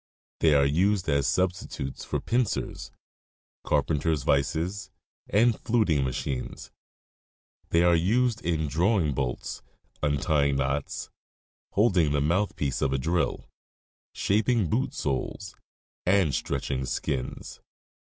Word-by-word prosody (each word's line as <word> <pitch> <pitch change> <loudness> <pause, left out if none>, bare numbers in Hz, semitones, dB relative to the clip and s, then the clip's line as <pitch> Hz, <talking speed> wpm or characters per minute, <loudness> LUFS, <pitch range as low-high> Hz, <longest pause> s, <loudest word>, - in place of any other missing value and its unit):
They 80 -2 +4
are 70 -1 +5
used 90 +6 +2
as 70 -2 +2
substitutes 90 -7 -2
for - - -2
pincers, 120 -2 -1 0.7
carpenter's 75 -2 +1
vices, 80 +8 0 0.4
and 115 +2 +3
fluting 105 - +2
machines. 65 0 -4 1.0
They 85 +1 +3
are 85 0 +5
used 115 +7 +2
in 80 -3 0
drawing 85 0 +2
bolts, 65 -3 -3 0.4
untying 75 -1 +1
knots, 70 +1 -2 0.6
holding 90 -8 +3
the 75 - +2
mouth 90 +8 +1
piece 70 -3 -2
of 70 - +1
a - - +1
drill, 85 +6 -1 0.7
shaping 105 -2 +1
boot - - 0
soles, 65 -2 -3 0.5
and 90 -6 +3
stretching 65 0 -2
skins. 65 0 -4
80 Hz, 110 wpm, -27 LUFS, 70-95 Hz, 1.0 s, are